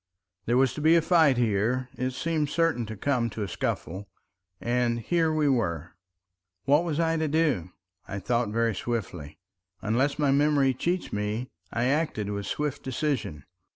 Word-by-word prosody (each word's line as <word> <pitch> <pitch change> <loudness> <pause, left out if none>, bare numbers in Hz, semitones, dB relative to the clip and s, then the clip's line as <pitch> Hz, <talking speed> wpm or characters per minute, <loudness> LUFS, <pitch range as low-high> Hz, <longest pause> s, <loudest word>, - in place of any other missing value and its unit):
There 120 +2 +3
was 130 -1 +3
to 150 - -5
be 160 +2 +5
a 170 - +5
fight 160 -7 +4
here, 120 +3 +1
it 130 +1 -1
seemed 155 +1 -1
certain 155 -8 +1
to 110 -1 -7
come 125 -1 0
to 105 0 -4
a - - -3
scuffle, 95 +2 -4 0.5
and 120 -1 0
here 165 +6 +1
we 155 -1 +1
were— 90 - 0 0.7
What 145 +4 +4
was 165 -3 -2
I 165 0 +2
to 160 0 0
do? 145 - +1 0.4
I 100 - -5
thought 120 +3 0
very 115 +1 +1
swiftly. 90 -9 -4 0.4
Unless 130 +7 0
my 145 -2 +2
memory 140 -1 +3
cheats 175 +8 -2
me, 105 +4 -2 0.2
I 120 - -1
acted 130 -7 0
with 100 0 -4
swift 145 -1 -2
decision. 130 - -2
125 Hz, 165 wpm, -27 LUFS, 110-150 Hz, 0.7 s, be